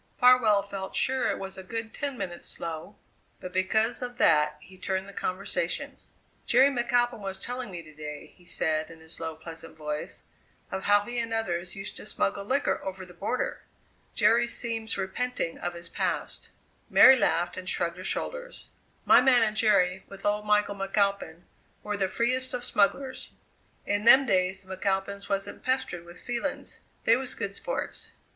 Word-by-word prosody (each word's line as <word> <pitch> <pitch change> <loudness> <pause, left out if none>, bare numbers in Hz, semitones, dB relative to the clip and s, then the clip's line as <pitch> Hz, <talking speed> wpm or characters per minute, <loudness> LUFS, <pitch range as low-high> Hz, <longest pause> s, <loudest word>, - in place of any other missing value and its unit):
Farwell 245 -5 +6
felt 195 -1 -6
sure 260 0 +2
it - - -1
was 190 0 -6
a - - -8
good 225 +3 -5
ten 280 -3 -3
minutes 175 -5 -5
slow; 165 +5 -6 0.4
but 180 0 -8
because 220 +6 +1
of 245 -1 -5
that 150 -4 +4
he 185 +5 -16
turned 190 +1 -2
the 200 - -10
conversation. 185 +1 -2 0.5
"Jerry 265 +4 +6
McAlpin 240 -1 +1
was 195 -1 -5
telling 245 +2 -5
me 175 -3 -7
to 155 -1 -15
day," 150 -1 -8
he 180 - -22
said 155 -2 -1
in 165 -1 -12
his 160 +1 -8
low, 160 -1 -4
pleasant 165 0 -9
voice, 150 -1 -5 0.5
"of 190 - -4
how 205 0 +5
he 240 +3 -4
and 230 -1 -2
others 175 -6 -2
used 195 +1 -7
to - - -9
smuggle 200 -1 0
liquor 270 +6 0
over 190 -1 -5
the 180 - -14
border. 200 +8 -2 0.5
Jerry 230 +2 +4
seems 225 -2 -2
repenting 195 -1 -2
of 175 0 -3
his 170 0 -7
past." - - -2 0.4
Mary 265 - +9
laughed 175 -8 +1
and 185 0 -4
shrugged 170 0 0
her 185 - -7
shoulders. - - -4 0.4
"My - - +8
man 250 -3 +5
and 215 -1 0
Jerry, 190 -4 +3
with 195 - -11
old 210 0 0
Michael 210 -1 +3
McAlpin, 195 -4 0 0.4
were 210 0 -2
the 195 -2 +1
freest 255 +4 0
of 245 0 -4
smugglers. 260 +6 +1 0.6
In 205 +1 0
them 260 +3 +8
days 190 -3 +1
the 190 0 -7
McAlpins 195 +1 -2
wasn't 195 0 -2
pestered 255 -10 -1
with 175 +1 -13
feelings; 245 +4 -3 0.2
they 230 - +6
was 260 0 -3
good 200 0 -3
sports. - - -4
200 Hz, 175 wpm, -28 LUFS, 180-235 Hz, 0.6 s, Mary